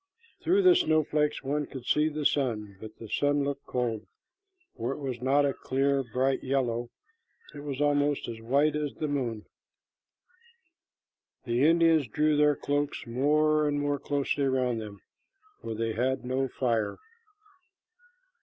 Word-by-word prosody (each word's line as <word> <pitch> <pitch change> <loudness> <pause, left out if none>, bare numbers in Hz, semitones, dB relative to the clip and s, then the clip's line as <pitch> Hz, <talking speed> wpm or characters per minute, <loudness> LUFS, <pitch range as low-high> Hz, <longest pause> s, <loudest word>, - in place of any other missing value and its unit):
Through 385 +4 +3
the 365 -1 +7
snowflakes 155 - +1
one 145 +1 -1
could 130 -3 -9
see 150 +3 +2
the 150 -1 -4
sun, 110 -9 0
but 110 0 -10
the 115 - -9
sun 145 +5 +1
looked 140 0 -4
cold, 115 -5 -2 0.7
for 120 +3 -3
it - - -8
was 130 -4 -5
not 140 +3 +3
a 140 - +1
clear, 135 +1 0
bright 130 +3 -1
yellow. 120 -3 -1 0.6
It - - -9
was 140 -2 -5
almost 145 -1 +1
as 115 -1 -7
white 140 +6 +2
as 150 -2 -3
the 155 - -3
moon. 120 -7 -3 2.0
The 120 +1 +1
Indians 165 -3 +4
drew 150 +7 +1
their 150 0 +4
cloaks 145 +1 -2
more 150 +5 +2
and 145 0 0
more 145 0 -1
closely 145 0 -1
around 130 -3 0
them, 105 -3 -9 0.6
for 115 - -5
they 115 0 -2
had 130 +3 -1
no 130 +1 0
fire. 115 -4 -1
140 Hz, 145 wpm, -28 LUFS, 120-145 Hz, 2.0 s, the